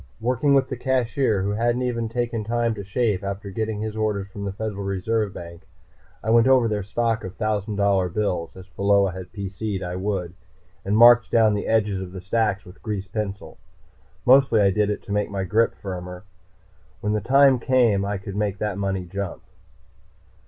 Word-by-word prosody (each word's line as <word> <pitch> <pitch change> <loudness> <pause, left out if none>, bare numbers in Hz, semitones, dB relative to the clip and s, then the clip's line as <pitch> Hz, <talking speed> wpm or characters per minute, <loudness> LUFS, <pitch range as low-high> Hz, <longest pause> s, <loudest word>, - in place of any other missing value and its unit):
Working 130 +4 +2
with 135 -1 +3
the 130 - -5
cashier, 125 -4 0
who 100 - -1
hadn't 120 +4 0
even 115 -2 -2
taken 120 -1 -2
time 115 +1 0
to 100 -2 -7
shave 105 -1 -1
after 100 +1 -5
getting 110 +1 -3
his 110 0 -4
orders 105 -3 -1
from 100 +1 -7
the 100 - -2
Federal 100 0 -5
Reserve 100 +2 -1
Bank, 85 -2 -10 0.6
I 110 - 0
went 115 +1 +5
over 130 -3 +5
their 105 -2 -1
stock 115 +3 -1
of 95 - -7
thousand 105 -1 -2
dollar 100 -2 +2
bills, 90 -3 -2
as 95 - -10
Pheola 100 0 +2
had 95 0 -9
PC'd 100 0 -4
I 90 0 -4
would, 95 -3 -3 0.5
and 100 +2 0
marked 120 0 +7
down 110 -2 +4
the 105 - -2
edges 105 -4 +1
of 90 -1 -8
the 95 - -7
stacks 105 +1 0
with 90 +2 -15
grease 105 -3 -4
pencil. 100 -5 -5 0.7
Mostly 130 -3 +5
I 100 -1 +4
did 105 +1 +1
it 105 - -3
to - - -9
make 105 0 0
my 100 -1 -3
grip 110 +5 +1
firmer. 90 -1 -7 0.8
When 105 +1 -1
the 105 - 0
time 135 +2 +5
came, 120 -6 +2
I 100 0 -2
could 100 0 -8
make 105 -1 -1
that 105 -1 -3
money 95 -2 -2
jump. 100 +1 -5
105 Hz, 190 wpm, -23 LUFS, 95-115 Hz, 0.8 s, marked